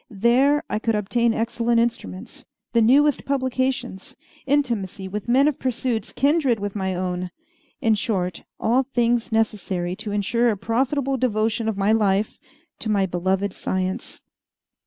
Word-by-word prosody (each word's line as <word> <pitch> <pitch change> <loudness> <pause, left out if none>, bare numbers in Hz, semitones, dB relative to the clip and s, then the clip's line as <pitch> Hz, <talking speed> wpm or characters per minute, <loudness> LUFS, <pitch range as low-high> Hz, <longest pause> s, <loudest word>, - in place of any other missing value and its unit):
There 245 +8 +3
I 210 - -2
could 225 0 0
obtain 235 +3 +1
excellent 230 +1 0
instruments, 95 - -3 0.3
the 230 - +4
newest 280 +5 +4
publications, 260 -5 -2 0.3
intimacy 230 -9 0
with 210 +4 -5
men 270 +4 +5
of 300 - -1
pursuits 240 -3 -2
kindred 280 -4 +2
with 205 0 -4
my 190 -2 -1
own 180 0 -3 0.5
in 225 - +3
short, 185 -4 -1 0.2
all 240 +4 +3
things 240 -3 0
necessary 195 -5 -1
to 210 - -5
ensure 230 +4 +1
a 215 - 0
profitable 265 +6 0
devotion 225 -1 0
of 215 - -3
my 200 +2 +2
life 210 -2 +1 0.4
to 220 - -3
my 200 -2 +2
beloved 190 +2 -1
science. 185 0 -3
225 Hz, 140 wpm, -23 LUFS, 195-250 Hz, 0.5 s, men